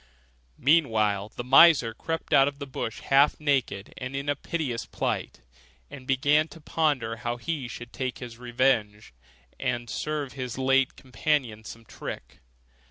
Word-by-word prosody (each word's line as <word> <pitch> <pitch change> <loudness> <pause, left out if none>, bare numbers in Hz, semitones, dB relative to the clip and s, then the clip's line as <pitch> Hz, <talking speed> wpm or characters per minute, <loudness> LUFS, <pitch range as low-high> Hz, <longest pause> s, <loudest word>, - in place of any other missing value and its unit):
Meanwhile 110 -9 +2
the 120 - -4
miser 135 -2 +6
crept 165 +6 -4
out 135 -1 +6
of 140 -1 -4
the 140 - -6
bush 130 -4 -5
half 140 +2 +4
naked 135 -9 -1
and 130 +1 -5
in 140 +1 -3
a 145 - +2
piteous 140 -6 -3
plight, - - -3 0.5
and 130 -2 -10
began 145 +4 +3
to 165 - -13
ponder 145 -8 0
how 120 +2 -3
he 145 -1 -3
should 120 0 -9
take 130 -2 -3
his 120 -2 -9
revenge, 120 - 0 0.5
and 120 -1 -2
serve 150 -3 -3
his 130 -3 -5
late 135 0 +2
companion 125 -3 -1
some 115 +1 -10
trick. - - -8
130 Hz, 150 wpm, -27 LUFS, 115-145 Hz, 0.5 s, miser